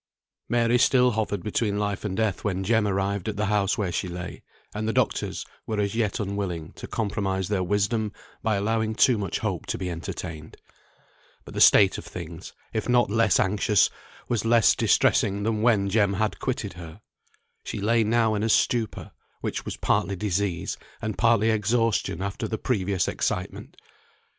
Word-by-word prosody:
Mary 120 +1 +3
still 125 0 +4
hovered 105 -4 -2
between 105 -1 -1
life 105 -1 -2
and 95 -3 -3
death 110 -4 0
when 95 -2 -1
Jem 110 +1 +2
arrived 100 0 -1
at 105 - -5
the 105 - 0
house 100 -1 +1
where 95 -4 -1
she 90 - -2
lay; 90 0 -7 0.3
and 110 +1 -3
the 110 - 0
doctors - - -1 0.2
were 110 -1 -2
as 100 0 0
yet 110 -3 -1
unwilling 95 -5 -3
to - - -9
compromise 100 -3 -2
their 100 -3 0
wisdom 105 +3 0 0.3
by 110 -2 +1
allowing 110 +2 0
too 125 - +5
much 100 -3 -2
hope - - -3
to - - -2
be 90 -1 -3
entertained. 80 -2 -7 0.9
But - - -10
the - - -2
state 95 -2 +6
of - - -11
things, 85 0 -8 0.2
if 110 +2 -2
not 120 -4 +3
less 115 0 +3
anxious, 105 +1 +3 0.4
was 120 -3 0
less 115 -1 +4
distressing 100 +1 +2
than 110 0 0
when 110 -4 +3
Jem 100 0 +2
had 110 +2 -1
quitted 125 -6 -3
her. 85 -2 -11 0.6
She - - -5
lay 115 +3 +2
now 110 0 +2
in 105 - -1
a 110 - 0
stupor, 115 0 +1 0.3
which - - -3
was - - -5
partly 100 - +1
disease, 95 -1 -2 0.2
and 110 -2 -3
partly 115 +2 +3
exhaustion 110 -4 0
after 100 +4 -3
the 110 - -3
previous 100 -8 0
excitement. - - -3
105 Hz, 170 wpm, -25 LUFS, 95-110 Hz, 0.9 s, state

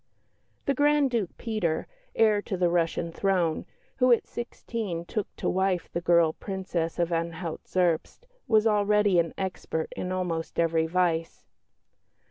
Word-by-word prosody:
The 280 - +2
Grand 290 0 +3
Duke 220 -7 -2
Peter, 215 -9 -1 0.3
heir 215 -2 +4
to 200 -2 -4
the 175 -1 +2
Russian 170 -1 0
throne, 180 -3 0 0.3
who 255 -1 +4
at 235 - +4
sixteen 220 -7 -5
took 210 +2 -3
to - - -3
wife 190 -1 0
the 170 - -1
girl 170 -2 +4
Princess 185 -4 -3
of 175 0 0
Anhalt 165 0 -3
Zerbst, 180 - 0 0.2
was 220 -2 +4
already 210 -3 +3
an 165 -1 +1
expert 185 -4 -3
in 180 - -3
almost 175 -3 -3
every 165 -1 +2
vice. 165 -1 0
180 Hz, 140 wpm, -27 LUFS, 170-210 Hz, 0.3 s, heir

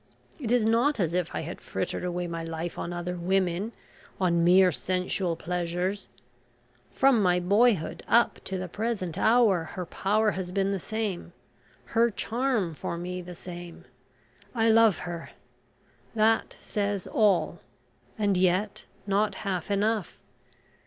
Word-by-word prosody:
It 240 -6 -3
is 245 -3 +3
not 235 +5 +2
as 170 -3 0
if 180 -2 -1
I - - -1
had 165 +3 -7
frittered 180 - -3
away 180 0 -2
my 165 -1 -4
life 165 +1 -5
on 170 - -4
other 175 +1 -4
women 185 +3 0 0.5
on 170 -2 +2
mere 180 +1 +6
sensual 180 +1 -1
pleasures. 180 +3 -2 0.8
From 265 -4 +3
my 180 -2 +3
boyhood 200 0 +2
up 235 +1 +3
to 190 - -3
the 185 0 -4
present 200 -3 -3
hour 220 -7 +4
her 180 -2 -3
power 210 +5 +1
has 185 -2 -5
been 195 +1 +1
the 195 - -1
same 215 -2 -4 0.6
her 230 +1 +4
charm 230 -5 -1
for 170 - -4
me 180 +1 -4
the 180 0 -9
same, 175 -1 -9 0.7
I 225 -1 +3
love 225 -3 +5
her. 170 -2 -6 0.9
That 225 +1 +2
says 200 -2 -2
all, 205 -5 +2 0.6
and 205 -2 +1
yet 185 +3 +1 0.2
not 200 0 +1
half 185 -3 -2
enough. 205 0 0
190 Hz, 140 wpm, -27 LUFS, 175-215 Hz, 0.9 s, mere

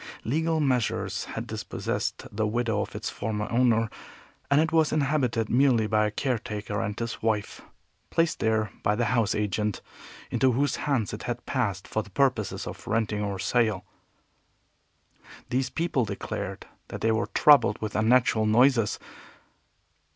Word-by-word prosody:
Legal 160 +6 0
measures 130 -6 0
had - - -5
dispossessed - - -3
the 110 0 +1
widow 115 -1 0
of - - -6
its - - -4
former 105 -1 -3
owner, 115 -2 +3 0.6
and 140 - +4
it 160 0 +2
was 160 -2 +3
inhabited 135 -7 +1
merely 125 -3 +3
by 105 0 +2
a - - -1
caretaker 105 -4 -3
and 105 +1 -3
his 115 -1 -4
wife, 110 -2 -1 0.5
placed 165 0 +1
there 110 -2 +1
by 105 +1 +1
the 120 +2 0
house 115 -4 +2
agent 105 0 -1 0.5
into 130 -2 +3
whose 140 +2 +1
hands 120 -9 0
it 105 - -5
had 120 0 -4
passed 100 -8 -2
for 110 - -1
the 105 - -13
purposes 125 -1 0
of - - -8
renting 110 -2 0
or 100 -1 -2
sale. 110 -3 +1 1.7
These 130 +1 0
people 165 -6 0
declared 100 -1 -5 0.2
that - - -7
they 115 - +2
were 110 +1 0
troubled 145 -8 +6
with 110 -2 -4
unnatural 110 -1 +3
noises. 115 -1 +4
115 Hz, 150 wpm, -27 LUFS, 105-130 Hz, 1.7 s, troubled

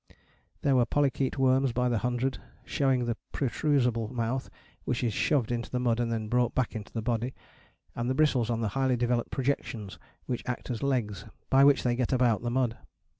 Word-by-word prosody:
There 140 -2 +3
were 125 -2 +3
Polychaete 140 -2 +1
worms 130 -1 +3
by 125 +1 +1
the 120 -3 +1
hundred, 125 +2 -1 0.3
showing 130 -3 +1
the 120 -1 -2
protrusable 125 -5 +1
mouth, 125 +1 -2 0.3
which 125 0 -1
is 115 -3 0
shoved 130 +1 +1
into 120 -1 -2
the 125 - -1
mud 120 -2 +1
and 120 -1 0
then 110 -2 -2
brought 120 +1 +1
back 130 -3 0
into 110 -1 -6
the 115 - -4
body, 120 +2 -1 0.6
and 120 +1 -2
the 130 - 0
bristles 130 -6 +2
on 115 -1 0
the 110 - 0
highly 130 +3 +1
developed 120 0 0
projections 125 -6 -3 0.3
which 125 -2 -2
act 125 +1 -3
as 115 - -4
legs, 120 - -1 0.3
by 135 +1 +6
which 140 -1 +5
they 120 -1 +1
get 125 -1 -1
about 125 -4 +3
the 120 - -2
mud. 120 -2 0
125 Hz, 195 wpm, -29 LUFS, 115-130 Hz, 0.6 s, by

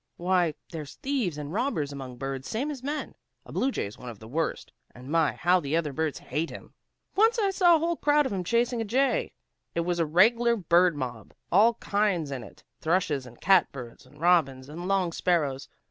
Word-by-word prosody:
Why, 175 -3 +1 0.2
there's 155 -4 -7
thieves 255 - -2
and 150 +1 -6
robbers 190 - -1
among 130 -3 -8
birds 135 0 -5
same 270 +7 -2
as 275 -4 -7
men. 290 +3 -4 0.3
A - - -12
blue 265 - +1
jay's 105 - -4
one 125 - -8
of 115 - -9
the 110 - -12
worst, 155 +6 -2 0.2
and 125 +2 -11
my, 165 -2 +3
how 180 +1 +3
the 150 0 -1
other 150 -4 -1
birds 160 0 -1
hate 160 +2 -3
him! - - -11 0.4
Once 450 +4 +4
I 405 -3 +2
saw 355 -3 +5
a - - +4
whole 335 +1 0
crowd 295 0 +3
of 265 - -2
'em 185 -2 -2
chasing 235 +4 +1
a - - 0
jay. 260 +6 +1 0.4
It 170 - +1
was 175 0 -1
a 165 - +3
reg'lar 230 +8 +4
bird 175 -3 +3
mob, 120 -6 -6 0.2
all 220 +6 +5
kinds 200 -9 0
in 130 -3 -4
it, - - -14 0.2
thrushes 160 -6 0
and 120 -1 -15
cat 190 -2 +4
birds, 120 -4 -10
and - - -19
robins, 150 -6 +2
and 170 +4 -6
song 190 -3 +1
sparrows. 145 -7 0
175 Hz, 205 wpm, -27 LUFS, 145-230 Hz, 0.4 s, saw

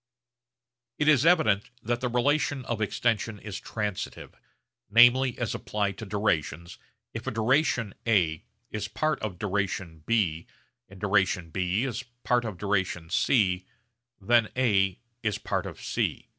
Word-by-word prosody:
It 150 - 0
is 150 0 +5
evident 110 - +3
that 120 +2 -1
the 125 - 0
relation 140 +2 +1
of 115 -2 -3
extension 115 0 0
is 105 -1 -7
transitive; 105 -3 -5 0.6
namely 120 +3 +6
as 120 - -2
applied 100 -2 -2
to 110 - -6
durations, 85 -5 -1 0.3
if - - -6
duration 115 -1 +1
A 85 -8 +2 0.3
is 105 0 -3
part 155 +7 -1
of 105 -5 -4
duration 95 -4 -2
B, 90 -8 +1 0.4
and 100 0 -13
duration 95 -4 +1
B 95 +5 0
is 130 -2 -2 0.2
part 120 -1 +2
of 105 -5 -5
duration 95 -4 -1
C, 95 -6 +2 0.5
then 115 +2 +3
A 95 -7 +2 0.2
is 105 -3 -1
part - - -2
of - - -9
C. - - -2
105 Hz, 135 wpm, -27 LUFS, 95-120 Hz, 0.6 s, namely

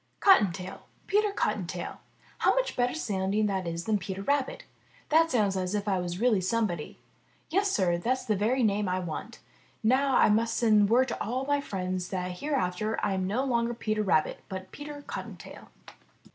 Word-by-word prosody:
''Cottontail, 195 - +3 0.3
Peter 420 +1 +2
Cottontail! - - -3 0.4
How - - +3
much - - 0
better 245 +2 +1
sounding 205 -6 0
that 190 -3 -1
is 170 0 -3
than 215 0 +1
Peter 195 0 -5
Rabbit! 280 +2 0 0.5
That 325 +2 +4
sounds 210 -7 +2
as 185 +1 -1
if 205 0 -2
I 195 -2 +2
really 185 +6 +1
was 185 0 -1
somebody. 205 -9 -1 0.5
Yes, 395 +4 +2
Sir, 180 - +1
that's 255 +7 -1
the 215 - +1
very 235 +6 +1
name 205 -2 +1
I 180 - 0
want. 185 +6 -6 0.4
Now 260 +4 +3
I - - +6
must 225 +2 +2
send 215 -3 +4
word 255 +3 +4
to - - -3
all 255 +5 -2
my 285 0 +1
friends 185 -5 -3
that 180 -1 -4
hereafter 220 -7 -1
I 200 - 0
am 190 -1 -1
no 230 +7 0
longer 235 -3 0
Peter 215 -2 -1
Rabbit, 175 -6 +1
but 190 0 -7
Peter 290 0 -8
Cottontail.'' - - -8
215 Hz, 175 wpm, -28 LUFS, 190-255 Hz, 0.5 s, I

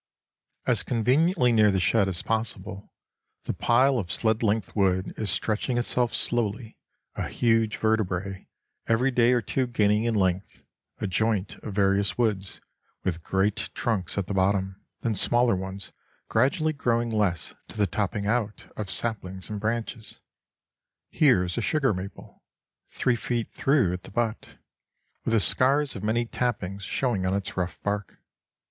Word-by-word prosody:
As - - +2
conveniently 125 - +2
near 110 -2 +5
the 95 -1 +1
shed 100 +2 +3
as 90 -3 -1
possible, 105 -3 -3 0.5
the - - -2
pile 130 +2 +3
of 90 -5 -4
sled 110 +4 +1
length 110 -1 0
wood 95 -2 +1
is 110 - -2
stretching 115 +3 0
itself 120 0 0
slowly, 115 -1 -1 0.4
a - - -3
huge 115 -2 +1
vertebrate, 100 -3 -1 0.4
every 120 +4 +2
day 120 -1 +4
or 120 -2 +2
two 130 +5 0
gaining 105 -2 +2
in 115 -1 +1
length; 95 -1 -1 0.4
a - - -2
joint 105 +1 0
of 105 - -8
various 100 0 +2
woods, 105 -5 -1 0.4
with 85 -3 -2
great 95 +5 0
trunks 105 -8 -1
at 100 - 0
the 100 - -4
bottom, 95 0 0 0.2
then 115 - 0
smaller 120 +3 +3
ones, 95 +1 -6 0.4
gradually 155 +7 +2
growing 120 -4 0
less 100 -7 0
to - - -12
the 105 - +3
topping 100 +2 -2
out 105 -1 -2
of 105 -3 -5
saplings 95 -5 -1
and 105 - -3
branches. 110 0 -3 0.9
Here 130 - +4
is 90 +4 -3
a - - -1
sugar 135 -1 +2
maple, 95 +1 -8 0.5
three 125 - +1
feet 120 -1 -3
through 135 -10 +2
at 90 - -4
the - - -11
butt, 115 +1 -3 0.7
with 115 - 0
the - - +5
scars 135 +7 +3
of 100 - -6
many 115 +3 +1
tappings 105 -6 -2
showing 110 -1 -1
on 95 +1 +1
its 100 -1 -4
rough 90 -1 -3
bark. 100 0 -3
110 Hz, 155 wpm, -26 LUFS, 95-120 Hz, 0.9 s, near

